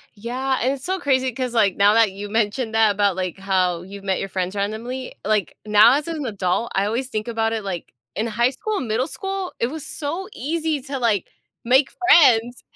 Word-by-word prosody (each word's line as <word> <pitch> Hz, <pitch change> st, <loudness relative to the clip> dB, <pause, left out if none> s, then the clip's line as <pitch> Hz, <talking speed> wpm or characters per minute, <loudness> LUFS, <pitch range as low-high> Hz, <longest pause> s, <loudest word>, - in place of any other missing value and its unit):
Yeah, 255 Hz, +5 st, -2 dB
and 255 Hz, +3 st, +1 dB
it's 265 Hz, -1 st, -9 dB
so 375 Hz, +1 st, -1 dB
crazy, 260 Hz, -4 st, +1 dB
'cause, 250 Hz, 0 st, -3 dB
like, 205 Hz, -5 st, +3 dB
now 205 Hz, +1 st, +5 dB
that 225 Hz, -3 st, +4 dB
you 200 Hz, +2 st, -7 dB
mentioned 220 Hz, +2 st, -1 dB
that, 220 Hz, -1 st, +5 dB
about, 200 Hz, -2 st, +1 dB
like, 185 Hz, -1 st, -3 dB
how 185 Hz, -3 st, 0 dB
you've 195 Hz, +2 st, -10 dB
met 190 Hz, -1 st, 0 dB
your 195 Hz, -, -4 dB
friends 185 Hz, 0 st, -3 dB
randomly, 225 Hz, +6 st, -4 dB
like, 205 Hz, -6 st, 0 dB
now 215 Hz, +3 st, +6 dB
as 290 Hz, +1 st, -1 dB
an 320 Hz, -4 st, -4 dB
adult, 200 Hz, +1 st, -1 dB
I 195 Hz, -, +2 dB
always 235 Hz, +5 st, -2 dB
think 215 Hz, -2 st, -4 dB
about 225 Hz, -1 st, 0 dB
it, 220 Hz, -, -3 dB
like, 180 Hz, -9 st, -6 dB, 0.2 s
in 215 Hz, -, -1 dB
high 235 Hz, +2 st, +1 dB
school 420 Hz, +11 st, -4 dB
and 260 Hz, -, -3 dB
middle 230 Hz, +5 st, 0 dB
school, 385 Hz, +1 st, -5 dB
it 235 Hz, -, 0 dB
was 310 Hz, +2 st, -7 dB
so 330 Hz, +6 st, -4 dB
easy 310 Hz, +1 st, -2 dB
to, 275 Hz, 0 st, -5 dB
like, 225 Hz, -6 st, 0 dB, 0.4 s
make 260 Hz, +3 st, +4 dB, 0.2 s
friends! 245 Hz, -, +5 dB
230 Hz, 210 wpm, -22 LUFS, 205-265 Hz, 0.4 s, now